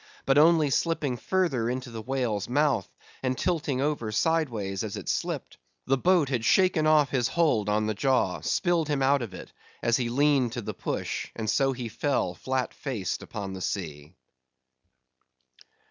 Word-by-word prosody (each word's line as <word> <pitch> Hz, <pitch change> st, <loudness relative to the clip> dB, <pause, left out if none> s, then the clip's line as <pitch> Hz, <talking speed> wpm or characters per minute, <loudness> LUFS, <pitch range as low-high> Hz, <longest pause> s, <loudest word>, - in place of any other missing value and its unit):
But 135 Hz, +1 st, +4 dB
only 155 Hz, -2 st, +5 dB
slipping 150 Hz, -3 st, 0 dB
further 135 Hz, -6 st, 0 dB
into 130 Hz, 0 st, -4 dB
the 115 Hz, -1 st, -6 dB
whale's 120 Hz, -5 st, -2 dB
mouth, 130 Hz, -6 st, +1 dB, 0.3 s
and 130 Hz, -1 st, -1 dB
tilting 150 Hz, -7 st, -1 dB
over 140 Hz, -7 st, -1 dB
sideways 115 Hz, -, 0 dB
as -, -, -4 dB
it -, -, -8 dB
slipped, -, -, -3 dB, 0.3 s
the 135 Hz, -, +3 dB
boat 170 Hz, +1 st, +3 dB
had 125 Hz, -5 st, -1 dB
shaken 180 Hz, 0 st, +3 dB
off 150 Hz, -2 st, +4 dB
his 125 Hz, -3 st, +1 dB
hold 125 Hz, -12 st, +1 dB
on 105 Hz, +1 st, +1 dB
the 110 Hz, -, 0 dB
jaw; 125 Hz, -6 st, +1 dB
spilled 175 Hz, -3 st, +1 dB
him 145 Hz, -2 st, 0 dB
out 140 Hz, +1 st, +3 dB
of 105 Hz, -6 st, -6 dB
it, -, -, -11 dB, 0.3 s
as 115 Hz, -1 st, +3 dB
he 120 Hz, -2 st, -1 dB
leaned 135 Hz, -2 st, +2 dB
to 120 Hz, -, -3 dB
the -, -, -4 dB
push; -, -, -4 dB
and 110 Hz, -1 st, -4 dB
so 135 Hz, -1 st, +2 dB
he 125 Hz, -2 st, -5 dB
fell 120 Hz, -5 st, -1 dB
flat 130 Hz, +8 st, -2 dB
faced 120 Hz, -10 st, -4 dB
upon 100 Hz, -3 st, -6 dB
the 95 Hz, -, -7 dB
sea. 80 Hz, -4 st, -5 dB
130 Hz, 170 wpm, -27 LUFS, 110-150 Hz, 0.3 s, only